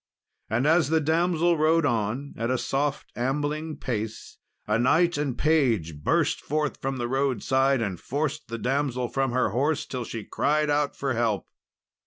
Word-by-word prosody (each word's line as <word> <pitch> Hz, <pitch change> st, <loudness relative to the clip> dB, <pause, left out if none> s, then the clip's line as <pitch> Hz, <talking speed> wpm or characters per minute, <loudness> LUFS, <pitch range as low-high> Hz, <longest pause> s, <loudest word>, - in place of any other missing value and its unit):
And 120 Hz, +5 st, +1 dB
as 160 Hz, 0 st, +4 dB
the 160 Hz, 0 st, +3 dB
damsel 165 Hz, +1 st, +2 dB
rode 160 Hz, +1 st, +3 dB
on 120 Hz, +3 st, -1 dB
at 115 Hz, +1 st, -2 dB
a 130 Hz, -, +1 dB
soft 140 Hz, +3 st, -2 dB
ambling 145 Hz, +5 st, -2 dB
pace, 110 Hz, -3 st, -5 dB, 0.3 s
a 105 Hz, +1 st, +1 dB
knight 165 Hz, +8 st, +3 dB
and 140 Hz, -4 st, -2 dB
page 115 Hz, -, +1 dB
burst -, -, +1 dB
forth 150 Hz, 0 st, -2 dB
from 135 Hz, 0 st, -2 dB
the 120 Hz, -1 st, -2 dB
roadside 135 Hz, 0 st, +1 dB
and 95 Hz, -5 st, -3 dB
forced 150 Hz, +2 st, -3 dB
the 115 Hz, -, -4 dB
damsel 125 Hz, -1 st, -1 dB
from 135 Hz, -2 st, 0 dB
her 130 Hz, -2 st, +1 dB
horse, 145 Hz, +8 st, 0 dB
till 125 Hz, -2 st, -4 dB
she 115 Hz, -1 st, -6 dB
cried 150 Hz, +5 st, +1 dB
out 145 Hz, -1 st, +1 dB
for 135 Hz, -2 st, -1 dB
help. 115 Hz, -4 st, 0 dB
135 Hz, 165 wpm, -26 LUFS, 120-150 Hz, 0.3 s, as